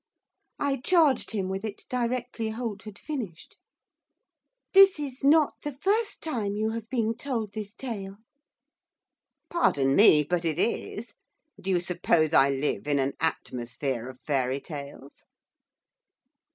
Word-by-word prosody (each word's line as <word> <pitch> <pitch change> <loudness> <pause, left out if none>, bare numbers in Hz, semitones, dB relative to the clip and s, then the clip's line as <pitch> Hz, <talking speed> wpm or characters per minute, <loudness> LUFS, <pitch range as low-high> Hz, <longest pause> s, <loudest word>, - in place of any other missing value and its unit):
I 280 -1 0
charged 300 -1 +3
him 200 -4 -2
with 190 +1 -4
it 215 -2 -6
directly 245 -2 -2
Holt 220 -2 -4
had 210 -2 -9
finished. 230 - -6 1.2
'This 390 -3 +7
is 275 -2 -6
not 300 +1 +5
the 295 - -4
first 415 +7 0
time 220 -10 -2
you 215 +1 0
have 225 0 -6
been 230 -3 0
told 225 -6 -3
this 210 -1 -6
tale.' 200 -7 -6 1.3
'Pardon 140 - +2
me, 155 -8 +7
but 175 +3 -1
it 160 -2 -1
is. 220 +2 -2 0.5
Do 195 - -4
you 180 -2 +3
suppose 170 -3 +1
I 135 -2 +6
live 140 +1 -2
in 145 -1 +2
an 135 0 0
atmosphere 125 -4 -2
of 130 -1 -12
fairy 135 -2 0
tales? 140 -2 -10
210 Hz, 135 wpm, -27 LUFS, 155-250 Hz, 1.3 s, This